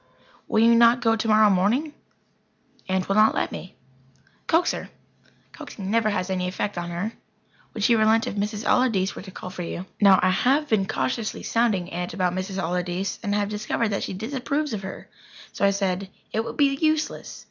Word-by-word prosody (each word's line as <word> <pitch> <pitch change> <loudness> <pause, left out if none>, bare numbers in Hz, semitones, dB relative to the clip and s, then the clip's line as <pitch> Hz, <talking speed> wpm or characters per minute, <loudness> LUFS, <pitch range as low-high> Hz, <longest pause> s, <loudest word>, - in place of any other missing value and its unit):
"Will 220 - +2
you 230 0 +6
not 235 +1 +6
go 225 -1 +3
tomorrow 215 -1 +4
morning?" 230 +12 +1 1.0
"Aunt 185 0 0
will 195 - +1
not 215 +1 +4
let - - -1
me." 185 - -8 0.7
"Coax 335 +2 +3
her." - - -6 0.6
"Coaxing 195 -1 -7
never 225 -1 +2
has 190 -2 -2
any 185 -1 -1
effect 200 +2 -3
on 175 0 -4
her." 180 +6 -3 0.6
"Would 215 - -3
she 235 - +5
relent 220 0 +3
if - - -4
Mrs. 210 +1 -3
Allardyce 220 -7 +2
were - - -7
to 190 - -10
call 185 0 -8
for 180 - -7
you?" 175 +1 -5 0.2
Now, 195 -2 +7
I 185 - +4
have 270 +10 +2
been 210 -7 +1
cautiously 230 -1 -2
sounding 210 -6 0
Aunt 175 +1 -4
about 180 -2 0
Mrs. 185 +1 -4
Allardyce, 180 +1 -2
and 205 -2 -1
I - - +2
have 205 -1 -1
discovered 215 +2 -1
that 200 - -2
she - - -4
disapproves 270 +6 -2
of 210 - -3
her. 190 0 -8 0.5
So - - 0
I - - +5
said: 195 -1 -1 0.2
"It 220 - 0
would - - -7
be 280 -2 +3
useless. 310 0 -1
205 Hz, 195 wpm, -24 LUFS, 185-230 Hz, 1.0 s, Now